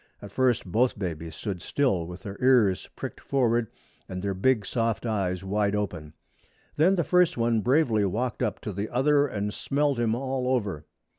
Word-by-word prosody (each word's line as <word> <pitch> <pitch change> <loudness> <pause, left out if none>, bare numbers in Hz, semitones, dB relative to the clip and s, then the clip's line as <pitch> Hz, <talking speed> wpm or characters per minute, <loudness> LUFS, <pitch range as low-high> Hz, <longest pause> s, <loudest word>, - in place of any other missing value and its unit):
At 100 - -10
first 125 0 +1
both 115 +7 +1
babies 85 -4 -5
stood 95 -5 -5
still, 95 - 0
with 90 +1 -9
their 100 0 -7
ears 120 -8 +3
pricked - - -6
forward 120 -4 +1 0.4
and 90 - -4
their 100 -1 -1
big 110 +2 +1
soft 115 +1 -1
eyes 95 -5 -1
wide 100 +1 0
open. 85 -7 -4 0.6
Then 175 +6 +4
the 170 - +1
first 180 -1 +3
one 115 -1 +2
bravely 120 -5 +2
walked 115 +6 -2
up - - -1
to 105 - -5
the 100 +3 -3
other 145 +3 +3
and 105 -3 -3
smelled 140 0 0
him 115 -1 +1
all 130 0 -2
over. 100 - -3
110 Hz, 175 wpm, -26 LUFS, 95-130 Hz, 0.6 s, Then